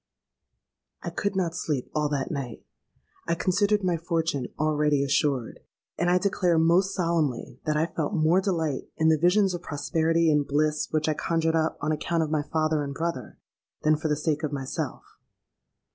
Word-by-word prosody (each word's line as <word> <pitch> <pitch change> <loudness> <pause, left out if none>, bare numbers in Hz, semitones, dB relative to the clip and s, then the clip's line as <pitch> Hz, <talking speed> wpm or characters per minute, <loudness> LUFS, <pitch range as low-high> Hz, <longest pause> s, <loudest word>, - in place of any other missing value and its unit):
"I - - -4
could 200 -1 -2
not 175 -3 0
sleep 150 -6 -3
all 150 -1 0
that 140 0 -2
night! 135 -7 -5 0.6
I 170 - +1
considered 200 +4 +1
my 180 -2 +1
fortune 165 -6 -1
already 150 -2 +2
assured; 135 -3 0 0.4
and 175 - 0
I 180 - +4
declare 180 -3 +1
most 175 +4 +3
solemnly 160 -9 -1
that 150 0 +1
I 155 - +2
felt 180 +4 -3
more 165 +3 +3
delight, 160 -8 -1
in 160 0 +3
the 160 -1 +3
visions 185 +3 +3
of 175 - -4
prosperity 160 +2 +1
and 150 -1 +2
bliss 150 +1 +1
which 155 0 0
I 155 - +2
conjured 165 +1 0
up, 160 0 0
on 150 - 0
account 160 +2 0
of 155 - -4
my 155 -2 +1
father 155 0 0
and 140 0 -5
brother, 165 -6 -4 0.5
than 155 0 +4
for 155 +1 -3
the 150 - +1
sake 150 -1 -1
of 155 -2 -2
myself. 135 -2 -4
160 Hz, 175 wpm, -26 LUFS, 150-170 Hz, 0.6 s, I